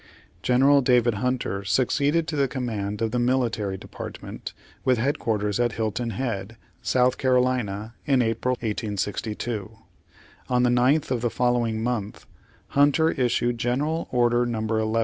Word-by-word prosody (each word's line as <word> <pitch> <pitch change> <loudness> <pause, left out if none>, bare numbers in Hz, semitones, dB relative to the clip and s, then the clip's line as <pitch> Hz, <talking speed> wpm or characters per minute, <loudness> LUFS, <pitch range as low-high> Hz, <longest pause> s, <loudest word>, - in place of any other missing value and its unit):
General 135 +5 +4
David 125 -2 +3
Hunter 115 -3 -2
succeeded 140 - +1
to 160 - -3
the 140 -2 +2
com 130 0 -4
mand 105 -2 -3
of 110 - 0
the 125 - 0
military 120 -6 0
department - - -8 0.3
with 130 -1 +3
head 135 +6 0
quarters 105 -2 -1
at 120 -2 +1
Hilton 115 +2 -2
Head, 115 -4 -4 0.3
S. - - -1
C., - - +1
in 125 -1 +1
April 115 +3 0
1862. 105 0 -3 0.7
On 125 -1 +2
the 125 - +3
9th 130 +5 +2
of 125 -3 0
the 120 - +1
following 120 -2 0
month. 115 -4 -3 0.4
Hunter 145 +3 +3
issued 120 -2 0
General 145 +8 -1
Order 120 -1 +2
No. 115 -2 -2
11. 110 0 0
120 Hz, 145 wpm, -25 LUFS, 110-130 Hz, 0.7 s, General